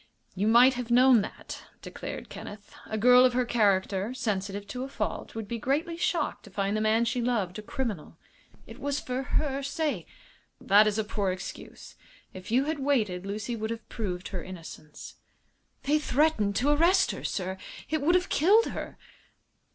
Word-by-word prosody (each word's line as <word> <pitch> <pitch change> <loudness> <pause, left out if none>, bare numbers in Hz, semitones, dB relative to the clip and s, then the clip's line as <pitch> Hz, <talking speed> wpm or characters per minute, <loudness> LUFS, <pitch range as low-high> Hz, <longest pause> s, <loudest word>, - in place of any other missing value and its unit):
"You 200 +3 -1
might 245 +4 +7
have 245 -2 -5
known 250 -1 +6
that," - - -8 0.2
declared - - -7
Kenneth. 205 0 -10
"A 220 - -3
girl 250 +3 +7
of 255 -1 +4
her 250 0 +1
character, 200 -1 +1
sensitive 200 -3 -3
to 250 +3 -4
a - - -4
fault, - - -4
would 225 -2 -5
be 235 +2 -4
greatly 295 +8 -1
shocked 335 - -1
to - - -12
find 200 +1 -1
the 215 - 0
man 220 +2 +3
she 240 +1 -1
loved 215 -6 -1
a - - -5
criminal." 220 - -5 0.5
"It - - -12
was 285 0 -1
for 255 +1 -3
her 275 0 -1
sake." 295 +2 -2 0.5
"That 205 +2 +5
is 210 0 0
a 220 - +1
poor 205 -2 -2
excuse. 185 +1 -8 0.4
If 185 0 -10
you 250 +4 +3
had 310 +1 -2
waited 215 -10 0
Lucy 210 +4 -3
would 220 -1 -4
have 230 -1 -6
proved 185 -6 -4
her 185 -3 -5
innocence." 165 -4 -10 0.7
"They 300 +2 +2
threatened 275 -9 +1
to 275 +6 +2
arrest 345 +6 +4
her, - - -7
sir. 190 0 -3 0.3
It 315 -1 -1
would 340 +5 +3
have 365 +1 +1
killed 410 +9 +4
her." - - -6
230 Hz, 180 wpm, -28 LUFS, 200-270 Hz, 0.7 s, might